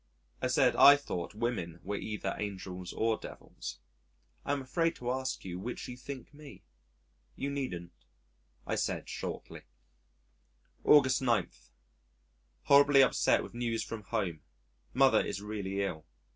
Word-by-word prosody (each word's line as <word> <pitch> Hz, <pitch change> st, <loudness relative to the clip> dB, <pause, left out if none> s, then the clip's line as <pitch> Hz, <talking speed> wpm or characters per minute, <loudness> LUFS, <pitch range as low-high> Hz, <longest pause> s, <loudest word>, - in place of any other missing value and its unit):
I -, -, +1 dB
said -, -, +3 dB
I 140 Hz, -, +9 dB
thought 105 Hz, -10 st, -5 dB
women 105 Hz, -7 st, -3 dB
were 100 Hz, +3 st, -3 dB
either 105 Hz, -2 st, -3 dB
angels 95 Hz, -3 st, -5 dB
or 110 Hz, -1 st, 0 dB
devils. -, -, -8 dB, 0.7 s
"I -, -, -2 dB
am 140 Hz, -1 st, -1 dB
afraid 165 Hz, +5 st, 0 dB
to 125 Hz, 0 st, -3 dB
ask 130 Hz, -3 st, -3 dB
you 90 Hz, -1 st, -5 dB
which 120 Hz, +6 st, -5 dB
you 125 Hz, -, -7 dB
think 130 Hz, +2 st, -9 dB
me." 145 Hz, -1 st, -13 dB, 0.7 s
"You 140 Hz, -, -3 dB
needn't," 95 Hz, -12 st, -4 dB, 0.7 s
I -, -, -2 dB
said -, -, -1 dB
shortly. -, -, -6 dB, 1.2 s
August 135 Hz, -4 st, +5 dB
9. 115 Hz, -8 st, +1 dB, 1.1 s
Horribly 140 Hz, -1 st, +7 dB
upset 130 Hz, -, +3 dB
with -, -, -10 dB
news 120 Hz, -1 st, -1 dB
from 115 Hz, -1 st, -6 dB
home. 95 Hz, -6 st, -3 dB, 0.5 s
Mother 135 Hz, +1 st, +4 dB
is 100 Hz, -, -4 dB
really 100 Hz, -2 st, -3 dB
ill. 80 Hz, -5 st, -4 dB
115 Hz, 135 wpm, -31 LUFS, 95-135 Hz, 1.2 s, I